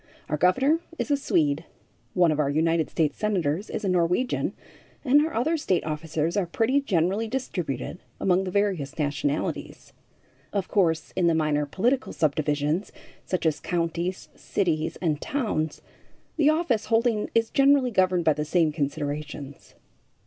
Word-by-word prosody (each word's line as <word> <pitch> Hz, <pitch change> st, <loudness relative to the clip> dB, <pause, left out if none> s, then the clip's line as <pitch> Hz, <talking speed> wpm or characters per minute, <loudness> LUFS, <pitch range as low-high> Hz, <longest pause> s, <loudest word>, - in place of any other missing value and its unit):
Our 150 Hz, -, 0 dB
governor 260 Hz, -, +3 dB, 0.2 s
is -, -, -2 dB
a -, -, +5 dB
Swede, 160 Hz, -, +1 dB, 0.5 s
one 175 Hz, -3 st, +4 dB
of 155 Hz, -, -1 dB
our 145 Hz, -2 st, +2 dB
United 160 Hz, +2 st, +1 dB
States 155 Hz, -3 st, 0 dB
senators 190 Hz, -3 st, 0 dB
is 215 Hz, -, -4 dB
a -, -, +1 dB
Norwegian, 180 Hz, +7 st, +1 dB, 0.5 s
and 290 Hz, +3 st, +5 dB
our 320 Hz, -, -2 dB
other 315 Hz, +8 st, +1 dB
state 190 Hz, -, 0 dB
officers 155 Hz, +2 st, -2 dB
are 200 Hz, -4 st, +1 dB
pretty 240 Hz, +10 st, +1 dB
generally 195 Hz, -, 0 dB
distributed 180 Hz, -, -4 dB, 0.2 s
among 185 Hz, 0 st, +2 dB
the -, -, -3 dB
various 185 Hz, -8 st, -1 dB
nationalities. 145 Hz, -1 st, -2 dB, 0.6 s
Of 200 Hz, -3 st, -1 dB
course, 165 Hz, -6 st, +1 dB
in 180 Hz, -2 st, +2 dB
the 165 Hz, -, +3 dB
minor 150 Hz, -2 st, +1 dB
political 245 Hz, -, 0 dB
subdivisions, 150 Hz, +3 st, 0 dB, 0.4 s
such 185 Hz, -2 st, -2 dB
as 160 Hz, -2 st, +1 dB
counties, 170 Hz, +1 st, -2 dB
cities 160 Hz, -5 st, -1 dB
and 155 Hz, -3 st, 0 dB
towns, 205 Hz, -, -2 dB, 0.5 s
the 305 Hz, -2 st, +4 dB
office 310 Hz, -8 st, +1 dB
holding 225 Hz, -1 st, +1 dB
is 225 Hz, 0 st, +2 dB
generally 275 Hz, -2 st, +4 dB
governed 185 Hz, -4 st, +2 dB
by 155 Hz, -, +5 dB
the 150 Hz, +1 st, -2 dB
same 160 Hz, 0 st, +2 dB
considerations. 145 Hz, -1 st, -4 dB
175 Hz, 150 wpm, -26 LUFS, 155-220 Hz, 0.6 s, a